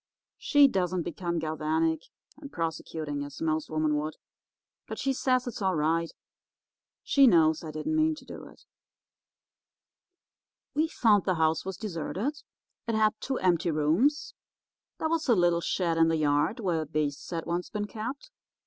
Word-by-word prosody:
She 290 -1 +5
doesn't 185 -6 -1
become 170 +1 -3
galvanic 160 0 0 0.4
and 285 -2 -10
prosecuting, 155 -3 -4
as 145 0 -9
most 160 -1 -1
women 155 -1 +1
would, 155 +1 -3 0.7
but - - -6
she 270 - 0
says 255 -1 +1
it's 245 -3 -6
all 190 -2 +1
right; 165 +2 0 0.9
she 275 -1 +5
knows 160 -6 +4
I 160 - -6
didn't 155 - -3
mean 315 0 +2
to - - -14
do - - -9
it. - - -18 2.1
"We 310 +2 +2
found 215 -10 +3
the 185 - +1
house 160 +1 +1
was 190 -2 -5
deserted. 215 - -4 0.5
It 230 - 0
had 215 -1 +3
two 265 -1 -2
empty 175 -2 +1
rooms. 165 - +1 0.6
There 315 - -1
was 320 -3 -1
a 235 - +6
little 175 -2 +3
shed 170 -2 0
in 165 - +5
the 165 0 +1
yard 150 - +1
where 175 -7 0
beasts 150 -1 -3
had 165 -2 -4
once 175 +1 -2
been 205 -1 -3
kept. 245 - -6
170 Hz, 160 wpm, -28 LUFS, 160-230 Hz, 2.1 s, a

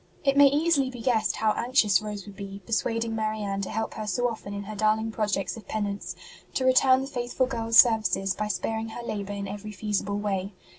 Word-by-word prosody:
It 275 -1 +2
may 285 0 +8
easily 290 -1 +2
be 250 -2 -9
guessed 225 -2 +1
how 220 -1 +2
anxious 225 -4 +2
Rose 210 -2 -6
would 205 -1 -11
be, 195 -1 -8
persuading 230 0 -1
Marianne 215 -2 -2
to 195 - -4
help 220 +1 -3
her 215 -1 -5
so 245 +5 +1
often 220 -4 -6
in 200 0 -5
her 215 +2 -7
darling 215 +1 +1
projects 205 -3 -1
of 215 -4 -12
penance, 205 -2 -3 0.4
to 260 - 0
return 260 0 +5
the 270 - -4
faithful 250 -1 -1
girl 235 -3 -4
s 230 0 +4
services 220 -5 +5
by 210 +1 -3
sparing 220 +1 -2
her 235 +2 -7
labour 205 -3 -4
in 200 0 -4
every 205 +2 -7
feasible 205 0 -2
way. 200 -1 -2
215 Hz, 210 wpm, -26 LUFS, 205-240 Hz, 0.4 s, may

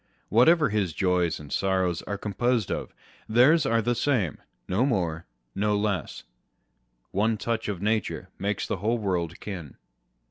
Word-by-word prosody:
whatever 150 +8 +5
his 100 -5 0
joys 90 -2 +1
and 75 -2 -8
sorrows 95 -3 +1
are 100 - -2
composed 110 +2 0
of, - - -3 0.4
theirs 135 +7 +5
are 115 -2 +2
the 120 - +1
same 115 - +1
â€" - - -18 0.3
no 95 +7 +1
more, 85 - -1 0.3
no 105 +1 +1
less. 100 -6 -2 0.9
One 110 +3 +1
touch 115 +1 -2
of 100 -2 -4
nature 110 -1 -1
makes 100 +1 -1
the - - -2
whole 110 +6 0
world 90 -6 -2
kin. 90 -8 -7
105 Hz, 150 wpm, -26 LUFS, 90-115 Hz, 0.9 s, whatever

